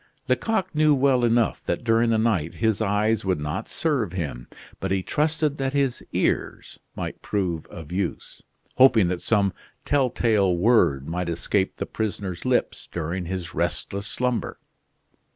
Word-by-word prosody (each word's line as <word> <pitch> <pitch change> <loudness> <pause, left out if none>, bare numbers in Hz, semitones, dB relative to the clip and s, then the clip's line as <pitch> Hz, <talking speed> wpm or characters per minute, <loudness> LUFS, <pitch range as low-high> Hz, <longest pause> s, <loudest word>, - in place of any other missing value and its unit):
Lecoq 195 -5 0
knew 155 -1 +4
well 130 -2 +3
enough 120 -1 +2
that - - -2
during 115 0 +3
the 115 - +3
night 100 -8 0
his 110 -2 +1
eyes 105 +1 +1
would 95 -4 0
not 75 +4 -4
serve 130 - -1
him, 70 -9 -4 0.3
but 95 - -3
he 95 -1 0
trusted 150 - 0
that 135 0 -1
his 140 -3 0
ears - - -1 0.2
might - - -5
prove 90 -6 -2
of 80 -3 -10
use, 90 -1 -4 0.4
hoping 115 -8 +6
that 90 -1 -2
some 100 -4 +2 0.3
telltale 115 -9 +2
word 85 - +3
might 85 +1 -2
escape 95 +3 0
the - - -3
prisoner's 100 -4 -4
lips 130 -1 0
during 85 +2 -3
his 90 -1 -4
restless 100 +2 -2
slumber. 125 0 -2
105 Hz, 150 wpm, -24 LUFS, 90-125 Hz, 0.4 s, hoping